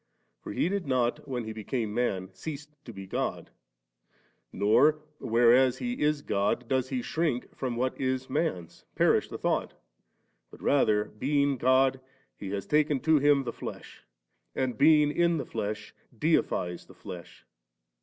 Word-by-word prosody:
For - - -8
He - - 0
did 195 -1 -2
noc, 125 -2 +1
when 125 -3 -3
He 110 0 -6
became 110 0 -3
man, 95 -6 -1
cease 145 +10 -7 0.2
to 120 - -8
be 95 -3 -9
God*; 95 - -3 1.0
not, 125 +9 +4 0.2
whereas 120 +2 +4
He 245 0 -4
is 150 -1 +1
God 105 +4 0
does 130 0 0
He 130 -3 -2
shrink 155 -6 -2
from 125 -3 -3
what 130 +3 -2
is 130 0 -1
man's; 90 - -3
perish - - +3
the - - -6
thought; - - -1 0.7
but - - -15
rather^ 105 -8 +1
being 140 +1 +2
God, 130 +1 +3 0.4
He 100 - -7
has 100 0 -3
taken 150 -2 +2
to 160 -2 +4
Him 145 -1 +4
the 120 -2 -5
flesh, - - -9 0.5
and 130 -2 -1
being 150 +3 +5
in 170 +1 +2
the 140 - -3
flesh 105 +1 -5 0.2
deifies 90 - 0
the - - -16
flesh. 85 -2 -10
130 Hz, 155 wpm, -28 LUFS, 110-145 Hz, 1.0 s, being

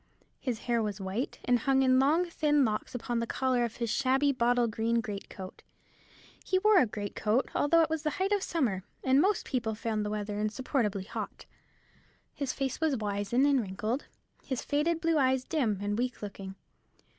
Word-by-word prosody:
His 245 -5 -3
hair 235 -2 +1
was 210 -2 -3
white, 195 +7 -3
and 245 -1 +3
hung 270 +2 +2
in 255 0 +4
long 310 +7 +3
thin 295 -4 +2
locks 215 +2 -3
upon 240 0 -2
the 230 - -2
collar 255 -1 +1
of 235 -2 -3
his 235 -2 -2
shabby 275 +1 +2
bottle 245 -1 +2
green 230 +1 0
great 210 -3 -5
coat. 185 -1 -9 0.8
He 375 - +1
wore 425 0 +5
a 255 - +4
great 205 -1 -5
coat, 220 +5 +1
although 330 +3 +4
it 315 - 0
was 320 -1 -1
the 305 - 0
height 385 +2 0
of 410 -1 +2
summer, 240 - -1 0.2
and 265 +2 +4
most 395 +2 +1
people 235 -4 -2
found 215 -1 -2
the 210 - -2
weather 210 0 -3
insupportably 215 -2 -1
hot. 195 - -6 0.9
His 280 -3 -2
face 270 +3 -3
was 310 -4 +2
wizen 205 +4 0
and 280 -3 +4
wrinkled, 215 +6 -3 0.4
his 260 -3 -3
faded 315 +3 0
blue 330 -2 +2
eyes 260 -1 +2
dim 255 -9 0
and 205 0 -1
weak 250 -2 -2
looking. 195 -1 -7
245 Hz, 190 wpm, -30 LUFS, 215-285 Hz, 0.9 s, wore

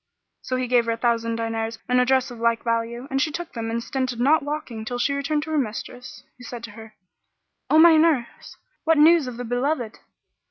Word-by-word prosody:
So 255 0 -3
he 255 0 -1
gave 240 -1 +3
her 230 - 0
a - - -5
thousand 230 -1 0
diners 225 0 -3
and 250 0 +3
a - - +2
dress 260 -1 +2
of 240 - -10
like 230 0 +1
value, 230 +2 -2
and 270 0 +1
she 310 - +1
took 345 +3 -6
them 225 -1 -4
and 230 +1 -2
stinted 255 -4 -3
not 290 +6 +4
walking 290 -6 -5
till 245 +3 -4
she 280 +3 0
returned 295 +2 -1
to 315 - -7
her 310 - +1
mistress, 245 +1 -6 0.2
who - - -12
said 240 -1 -8
to 230 - -7
her, 220 0 -13 0.7
"O 310 - +4
my 325 0 +8
nurse! 310 -7 0 0.3
what 325 0 +3
news 315 -1 +5
of 245 -2 -7
the 245 - -5
be 245 +1 -2
loved?" 250 -4 -2
245 Hz, 230 wpm, -23 LUFS, 230-290 Hz, 0.7 s, my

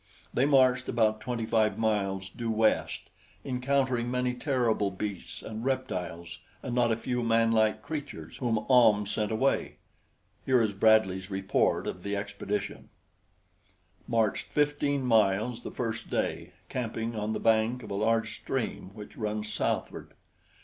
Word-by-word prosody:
They 130 +3 +3
marched 130 -3 +4
about 110 -2 +2
twenty 120 -3 -3
five 110 -1 +2
miles 100 -4 0
due 115 +4 -5
west, 110 0 +1 0.3
encountering 130 -2 0
many 125 0 0
terrible 125 -6 +1
beasts 100 0 -6
and 110 +1 -6
reptiles 90 -10 -3 0.2
and 125 - -4
not 120 -1 +3
a 110 - +1
few 125 +1 -2
manlike 115 -1 +2
creatures 140 - -6
whom 115 -4 -1
Ahm 115 -5 +5
sent 105 +2 -2
away. 125 +5 0 0.7
Here 130 -1 +3
is 110 -3 +1
Bradley's 95 -2 +3
report 95 -1 +1
of 90 - -5
the 100 +2 -3
expedition: 100 0 -4 1.2
Marched 110 -4 +1
fifteen 145 -2 0
miles 110 +1 +2
the - - -6
first 115 -2 -4
day, - - -2
camping 115 -1 -3
on 105 0 -2
the - - -2
bank 115 +2 +2
of - - -9
a - - -2
large 110 +2 +1
stream - - -3
which 105 -1 -10
runs 105 -1 -3
southward. - - -3
110 Hz, 140 wpm, -29 LUFS, 105-125 Hz, 1.2 s, Ahm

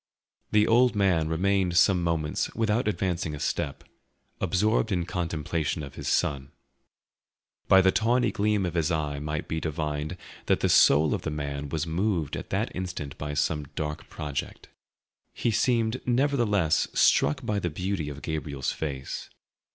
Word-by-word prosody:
The 105 0 +4
old 120 +1 +4
man 90 -6 +2
remained 90 +1 +1
some 90 0 +5
moments 80 -3 -1
without 110 +1 +1
advancing 90 -6 -1
a - - -8
step, 70 -1 -2 0.6
absorbed 105 +5 +1
in 90 -3 0
contemplation 85 -3 -2
of 70 -1 -8
his - - -7
son. 70 -1 0 1.2
By 95 - +7
the 95 0 +4
tawny 120 +5 +2
gleam 105 -1 +1
of 90 - -3
his 85 -1 +1
eye 75 -3 -1
might 75 +1 -4
be 80 - -2
divined 75 +1 -3 0.3
that - - +2
the - - +2
soul 75 +2 +5
of - - -2
the - - -3
man 70 -1 -4
was 80 +1 -2
moved 85 -2 -1
at - - -7
that - - -2
instant 90 -6 -5
by 75 0 -4
some 75 +1 0
dark 75 -1 -4
project. 75 -2 -5 0.7
He 120 - 0
seemed 115 +1 +1
nevertheless 120 - +2
struck 75 - +3
by 105 -1 0
the 90 - -2
beauty 90 -1 -3
of 70 0 -9
Gabriel's 75 -4 -3
face. 70 -4 -5
85 Hz, 155 wpm, -27 LUFS, 75-100 Hz, 1.2 s, By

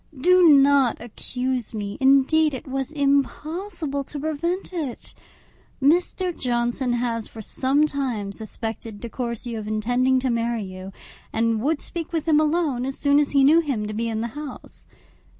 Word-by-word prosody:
Do 360 +3 +6
not 280 -3 +5
accuse 250 +1 -4
me; 205 -1 -5
indeed, 275 +3 +4
it 260 - -8
was 270 +1 -3
impossible 290 +2 -1
to 290 - -6
prevent 335 +6 -2
it. 300 -9 -5 0.7
Mr. 350 +5 +1
Johnson 240 0 0
has 235 -2 -1
for 220 - -10
some 275 +7 +2
time 255 -9 -3
suspected 220 0 -5
De 235 - -7
Courcy 235 0 -4
of 215 -2 -5
intending 245 +5 +1
to 255 -1 0
marry 230 -1 -1
you, 185 0 -8 0.4
and 225 -1 +1
would 295 +4 0
speak 335 -2 -5
with 325 -1 -2
him 305 -2 +5
alone 305 -5 +1
as 270 +1 -3
soon 285 0 +3
as 295 - +1
he 275 -1 +3
knew 305 +5 +6
him 270 -10 -1
to 215 - -5
be 230 +2 -2
in 220 -1 -2
the 235 - -3
house. 295 -3 -9
265 Hz, 165 wpm, -23 LUFS, 230-300 Hz, 0.7 s, Do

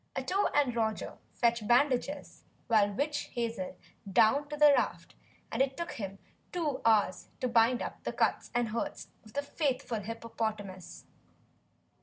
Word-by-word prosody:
Ato 395 +2 +1
had 275 -5 +2
Roger 220 -2 -2
fetch 235 -3 +1
bandages 275 +3 +1 0.3
and 205 -2 +4
witch 290 +1 -1
hazel 230 -6 -3 0.3
down 275 +9 +4
to 295 - -4
the 295 -1 +7
raft 250 - -1 0.4
and - - 0
it 270 0 +1
took 340 0 -3
him 195 -3 -6 0.3
two 315 -7 -1
hours 210 -5 +3
to 255 - 0
bind 235 +1 +3
up - - -7
the - - -2
cuts - - 0
and 240 -2 +1
hurts 230 +2 -4
of 215 - -16
the 285 - -1
faithful 265 -6 -1
hippopotamus. 215 -4 -5
235 Hz, 145 wpm, -31 LUFS, 220-285 Hz, 0.4 s, the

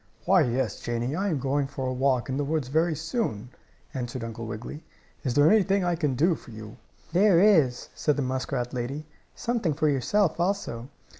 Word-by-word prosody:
"Why, 185 0 +5
yes, 125 -3 0
Janie, 120 +4 -2
I 200 +3 0
am 160 - 0
going 135 +1 0
for 135 -1 -5
a 130 - -1
walk 130 -1 +1
in 130 - -2
the 145 - 0
woods 145 -3 -1
very 160 +3 +2
soon," 150 - -3 0.4
answered 125 -1 -4
Uncle 115 0 -6
Wiggily. 115 +8 -7 0.4
"Is 130 -4 -1
there 145 +1 +6
anything 200 -2 +3
I 175 -1 +1
can 150 -5 -1
do 165 +7 +3
for 150 - -10
you?" 110 -1 -10 0.4
"There 185 -1 +5
is," 160 -12 +3
said 150 - 0
the 145 - -1
muskrat 130 -1 -2
lady. 135 +5 -4 0.3
"Something 230 -11 -1
for 155 +1 +1
yourself, 160 +7 +1
also." 170 -10 -2
140 Hz, 190 wpm, -26 LUFS, 125-170 Hz, 0.4 s, there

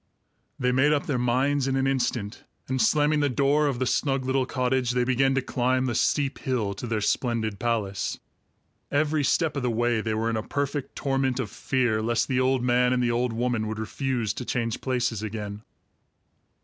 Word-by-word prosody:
They 125 0 +1
made 135 +4 +3
up 145 - 0
their 135 -4 -1
minds 130 +3 +1
in 135 - 0
an 135 0 +1
instant, 120 -5 -1 0.2
and 130 -1 0
slamming 150 +6 +3
the 145 -1 +2
door 140 +4 +2
of 135 -4 -1
the 130 - 0
snug 135 0 0
little 130 0 +1
cottage, 130 -1 0
they 125 0 +2
began 135 +2 +2
to 135 - +1
climb 130 +1 0
the 125 - -1
steep 140 +3 +1
hill 115 -7 -1
to 110 +5 -6
their 110 -2 -1
splendid 110 -2 -1
palace. 110 -4 -1 0.7
Every 150 +1 +1
step 160 +3 +1
of 140 - -1
the 125 - 0
way 120 0 +1
they 110 0 -2
were 115 +1 0
in 110 - -1
a - - -1
perfect 140 +3 -3
torment 135 -2 0
of 115 -6 -3
fear 120 -5 0
lest 115 0 0
the 130 -1 +1
old 130 -1 +2
man 125 0 +3
and 125 -1 +1
the 120 - +2
old 120 +1 0
woman 115 -1 -1
would 110 0 -4
refuse 115 0 -2
to - - -5
change 115 -2 -2
places 125 -4 -1
again. 105 -1 -5
125 Hz, 200 wpm, -26 LUFS, 115-135 Hz, 0.7 s, made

